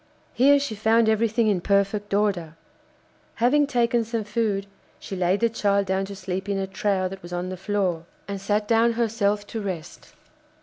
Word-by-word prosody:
Here 280 +3 +5
she 280 -4 -3
found 220 +2 +3
everything 220 +1 +2
in 195 -4 +1
perfect 200 +2 0
order. 195 -6 0 0.8
Having 280 +5 +3
taken 240 -3 +1
some 225 0 -3
food, 210 -2 -1 0.3
she 195 - -7
laid 185 +2 +1
the 230 - +4
child 200 -3 +1
down 190 +1 0
to 200 0 -8
sleep 190 +1 -4
in 200 - 0
a 195 - -1
trough 190 -1 -1
that 195 0 -8
was 175 - -11
on 175 +1 -3
the 185 - -4
floor, 185 -4 -1 0.2
and 200 -1 -5
sat 210 +1 0
down 230 +1 +3
herself 210 -3 0
to 220 +1 -5
rest. 175 -5 -7
205 Hz, 180 wpm, -24 LUFS, 190-225 Hz, 0.8 s, Here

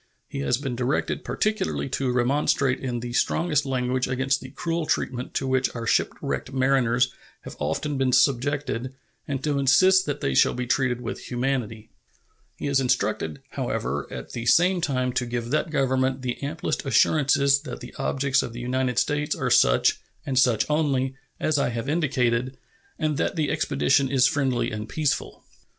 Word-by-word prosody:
He - - -6
has 70 - +1
been 135 -2 -4
directed 125 +3 -1
particularly 215 -8 -1
to 130 0 -1
remonstrate 130 +1 +1
in 125 -3 -3
the 120 0 -5
strongest 150 +1 +1
language 125 -1 0
against 135 +1 0
the 130 - -9
cruel 165 +3 -3
treatment 125 -1 -2
to 135 - 0
which 130 0 +1
our 115 -1 -4
shipwrecked 130 - -1
mariners 125 -2 +2 0.3
have - - -9
often 145 -2 -2
been 130 -1 +2
subjected 130 -1 +1 0.3
and 135 -2 -3
to 145 -2 0
insist 185 +8 +5
that 145 - -2
they 70 - -1
shall - - +4
be 125 0 -3
treated 125 -1 0
with 115 - -6
humanity. 120 -4 -2 0.7
He - - -6
is 140 -1 +2
instructed, 100 - -1
however, 70 +3 -3
at - - -7
the 120 0 -5
same 180 +4 +4
time, 130 -5 0
to 125 - 0
give 120 0 -4
that 155 +2 0
Government 130 -2 0
the 125 -1 -3
amplest 160 +5 -3
assurances 140 +1 +3
that 140 -5 -7
the 125 -1 -10
objects 140 -1 +1
of 115 - -6
the 120 - -7
United 125 0 -1
States 150 0 +1
are - - -2
such, - - +4 0.3
and 130 -2 +1
such 120 -5 +3
only, 140 -4 +1 0.3
as 155 -2 +1
I - - +1
have 115 +2 -4
indicated, 130 -5 0 0.4
and 155 -3 -1
that 165 - -1
the 155 -4 0
expedition 140 -2 +1
is 130 -2 +3
friendly 135 -5 +1
and 105 0 -5
peaceful. 155 -3 -2
130 Hz, 170 wpm, -25 LUFS, 125-145 Hz, 0.7 s, insist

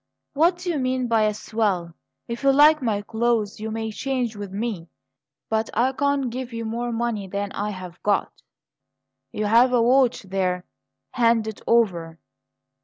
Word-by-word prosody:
"What 335 +5 +3
do 355 0 -3
you 305 - -1
mean 255 0 0
by 225 -2 +3
a 210 - +1
swell? 200 -6 -1 0.3
If 235 0 -5
you 275 0 +4
like 300 +2 +6
my 215 -4 -1
clothes 220 -2 0
you 220 +1 -4
may 220 0 -3
change 250 -1 -2
with 205 -2 -7
me, 200 -4 -4 0.6
but 220 0 -1
I 245 +4 +3
can't 280 -2 0
give 255 +1 -5
you 230 0 -5
more 235 +2 -3
money 230 -4 -2
than 200 +1 -3
I 205 +1 -3
have 185 -3 -8
got." 205 -1 +1 1.0
"You 210 - -2
have 235 +4 +5
a 245 - +4
watch 250 -1 +3
there. 185 -2 -1 0.5
Hand 230 -3 +2
it 220 - -6
over." 175 -9 +1
225 Hz, 170 wpm, -23 LUFS, 205-250 Hz, 1.0 s, like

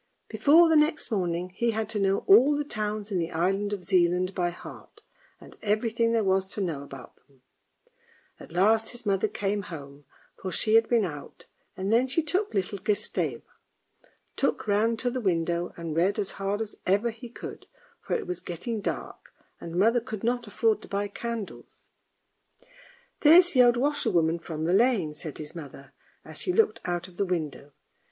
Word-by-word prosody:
Before 325 +4 +5
the 320 - +3
next 305 -3 +2
morning 180 -3 -1
he 235 +6 -1
had 220 -1 -1
to 220 -2 -2
know 195 0 +1
all 260 +9 +6
the 295 - -1
towns 215 -5 -4
in 185 - 0
the 165 -1 -2
island 195 +5 0
of 200 -3 -4
Zealand 180 0 +2
by 175 -2 0
heart, 175 - -12 0.4
and - - -15
everything 225 +2 +1
there 230 -1 +2
was 190 0 +1
to - - -4
know 165 -8 -2
about 135 -2 -11
them. 135 -3 -30 1.0
At - - -12
last 215 +5 +3
his 240 -1 -7
mother 200 +1 +1
came 205 0 -2
home, 145 -6 -10 0.3
for 190 - -6
she 215 +5 +1
had 225 0 +5
been 230 -4 +3
out, 145 -5 -9 0.3
and 195 +3 -1
then 245 +3 +4
she 280 +5 0
took 375 +7 0
little 195 +1 -2
Gustave. 210 +1 -1 0.9
Tuk - - 0
ran 220 +3 +2
to 245 +1 -1
the 255 0 -3
window 175 -2 0
and 165 -2 -5
read 185 +5 +2
as 205 -3 -1
hard 200 +2 -2
as 220 -1 -6
ever 205 +5 +2
he 230 +2 -11
could, 240 - -9 0.3
for - - -2
it - - -3
was 180 -1 -4
getting 210 +7 -5
dark, - - -6 0.2
and 170 0 -8
mother 225 +6 +3
could 220 -3 -7
not 240 0 -1
afford 220 +1 +1
to - - -12
buy 200 +1 -2
candles. 230 -1 -7 0.6
" - - -26
There's 345 +4 +7
the 255 - +5
old 240 -1 +5
washerwoman 205 - +1
from 160 -2 -6
the 175 - +1
lane," 205 -8 +2
said 150 -1 -7
his 150 -1 -8
mother, 140 -4 -10 0.3
as - - -9
she 365 - -1
looked 435 +2 +2
out 175 0 -2
of 180 -1 -18
the 200 - +1
window. 150 -5 -4
205 Hz, 185 wpm, -27 LUFS, 175-235 Hz, 1.0 s, There's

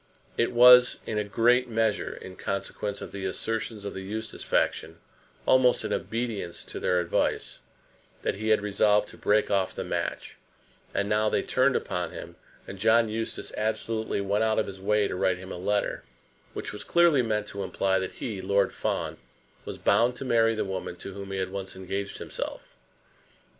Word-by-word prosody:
It 115 - +1
was, 125 +1 +8
in 105 - -1
a - - 0
great 120 +4 +3
measure, 110 -2 0
in 95 - -10
consequence 100 +1 -4
of - - -8
the 100 -1 -6
assertions 110 +2 -3
of 100 - -4
the 95 - -6
Eustace 110 +3 -5
faction, - - 0 0.5
almost 130 -1 +4
in - - -1
obedience 110 -7 -3
to - - -7
their 90 - +2
advice, 85 -1 -1 0.6
that - - +1
he 110 +2 -5
had 110 -1 +3
resolved 105 0 +2
to - - -12
break 105 0 +2
off 95 -2 +1
the - - -3
match; - - -3 0.5
and 100 - -1
now 105 +1 +2
they - - +1
turned 130 +1 +2
upon 90 0 -2
him, - - -8 0.3
and 95 - -8
John 110 +2 +4
Eustace 110 +1 -4
absolutely 110 -1 -1
went 100 +2 +1
out 110 -1 +1
of 110 - +2
his 95 -1 -8
way 105 +1 +2
to - - -4
write 90 0 +1
him 95 +1 -9
a - - -5
letter 100 +3 -1 0.5
which - - -5
was 105 - -6
clearly 170 -5 +4
meant 105 -3 -1
to 100 - -5
imply 95 0 0
that 95 - -4
he, 105 -6 -5
Lord 100 +1 +2
Fawn, - - -2 0.5
was - - -6
bound 120 +2 +3
to 135 - -6
marry 115 -2 +3
the 110 - -1
woman 95 -2 -4
to 95 +2 -8
whom 100 0 -7
he 95 - -3
had 95 0 -2
once 95 -1 -5
engaged 95 +2 -4
himself! - - -6
105 Hz, 185 wpm, -27 LUFS, 95-115 Hz, 0.6 s, was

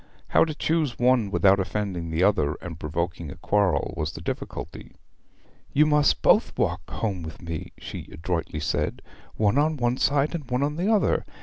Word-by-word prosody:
How - - +5
to 155 -2 -5
choose 155 -5 0
one 120 -4 +3
without 100 0 +4
offending 95 -3 -2
the 80 +3 +1
other 75 -8 +2
and 85 -3 -8
provoking 85 +1 -3
a - - -8
quarrel 100 -8 +1
was 75 0 -2
the - - -8
difficulty. - - -6 0.8
'You 150 +2 +5
must 150 -1 +3
both - - +4
walk - - -1
home 100 -5 -2
with 80 0 -8
me,' 85 -2 -6
she - - -8
adroitly 80 -1 -3
said, 75 - -1 0.3
'one 110 +5 +2
on 155 +1 +2
one 120 0 +1
side, 140 +3 +2
and 150 -7 -5
one 125 +2 +1
on 145 +1 -1
the 185 +7 +1
other. 215 -3 +2
105 Hz, 180 wpm, -25 LUFS, -, 0.8 s, How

